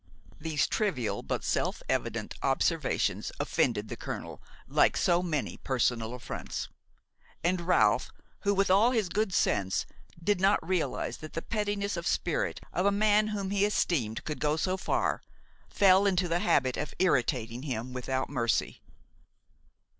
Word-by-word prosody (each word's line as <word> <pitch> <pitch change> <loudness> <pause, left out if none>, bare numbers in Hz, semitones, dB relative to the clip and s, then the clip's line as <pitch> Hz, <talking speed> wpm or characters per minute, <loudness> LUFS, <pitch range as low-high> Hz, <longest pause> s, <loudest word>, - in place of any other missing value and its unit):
These 150 -2 0
trivial 180 - -1
but - - -3
self - - -1
evident - - -2
observations - - 0
offended - - 0
the - - -5
colonel - - -6 0.3
like - - +3
so 175 0 +3
many 155 -6 -2
personal 120 -2 0
affronts; 125 - -5 0.7
and 175 +1 +1
Ralph 175 +2 +3 0.3
who, 200 -1 +1
with 195 -1 +2
all 205 +5 +6
his 220 -7 0
good 210 +2 0
sense, 100 - +1 0.3
did 185 +2 0
not 195 +2 +3
realize 180 -3 -1
that 155 - -10
the 165 - -4
pettiness 205 -3 -2
of 170 - -3
spirit 170 - 0
of 180 +3 +1
a - - +4
man 210 +1 +3
whom 200 -2 -3
he 200 0 +2
esteemed 155 - 0
could 150 - -4
go 150 0 +1
so 185 +3 0
far, 190 - 0 0.5
fell 195 0 +5
into 185 -2 +2
the 170 +1 +1
habit 135 -8 +2
of 150 - -4
irritating 125 -8 +1
him 125 -3 -4
without 130 +1 -2
mercy. 120 -4 -1
175 Hz, 145 wpm, -29 LUFS, 130-200 Hz, 0.7 s, all